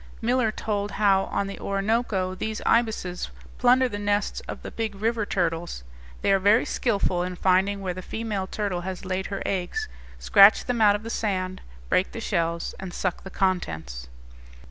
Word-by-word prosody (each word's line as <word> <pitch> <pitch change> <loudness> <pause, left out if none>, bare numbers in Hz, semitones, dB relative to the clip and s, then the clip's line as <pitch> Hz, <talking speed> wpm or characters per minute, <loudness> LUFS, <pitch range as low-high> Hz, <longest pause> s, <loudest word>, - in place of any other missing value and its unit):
Miller 240 -1 +1
told 205 -2 -3
how 195 -2 +3
on 200 - -1
the 195 - -6
Orinoco 195 -2 0
these 215 +3 -3
ibises 220 -6 +1 0.3
plunder 255 +1 +5
the 205 -4 -5
nests 205 0 0
of - - -7
the - - -6
big 220 -3 -3
river 220 +1 -1
turtles. 170 - -1 0.4
They - - +3
are 195 - +4
very 205 +5 +4
skilful 200 -6 0
in 180 0 -3
finding 190 +2 +2
where 185 -2 -2
the 185 - -7
female 210 -1 -3
turtle 195 -4 -2
has 185 +1 -6
laid 185 0 -2
her 195 - -4
eggs, 195 - -2 0.3
scratch 200 0 +6
them 245 -2 -1
out 205 -1 +6
of 210 - -5
the 230 - -5
sand, 185 -4 -2 0.3
break 185 - +1
the - - -5
shells, 170 -6 -1
and 190 -2 -7
suck 185 -2 -2
the 190 - -8
contents. 80 - -2
195 Hz, 175 wpm, -25 LUFS, 185-220 Hz, 0.4 s, scratch